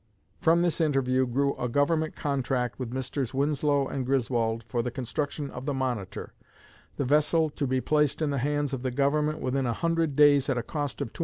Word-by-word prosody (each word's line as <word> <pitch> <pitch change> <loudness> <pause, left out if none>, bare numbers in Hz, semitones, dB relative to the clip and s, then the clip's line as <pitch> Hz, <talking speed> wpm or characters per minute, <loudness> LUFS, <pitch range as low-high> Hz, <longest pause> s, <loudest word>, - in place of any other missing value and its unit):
From 170 +1 +4
this 175 -1 +1
interview 130 -4 +2
grew 140 +3 0
a 125 - -2
Government 155 +4 +1
contract 130 -3 -1
with 125 -3 -4
Messrs. 130 0 -3
Winslow 145 0 +1
and 135 - -3
Griswold 120 -3 0
for 120 +2 -2
the 125 - -2
construction 140 +3 -4
of 135 - -8
the 145 - 0
'Monitor,' 125 -8 -3 0.6
the 140 - 0
vessel 150 +3 +2
to 145 -1 -2
be 130 0 0
placed 150 0 +1
in 155 -2 0
the 140 - -1
hands 145 +1 -1
of 130 - -3
the 130 - -1
Government 150 +4 0
within 130 0 0
a 120 - 0
hundred 165 0 0
days 145 -2 +5
at 135 - +1
a 120 - -1
cost 145 +1 -4
of 110 - -8
$275,000. - - -13
140 Hz, 205 wpm, -27 LUFS, 125-150 Hz, 0.6 s, days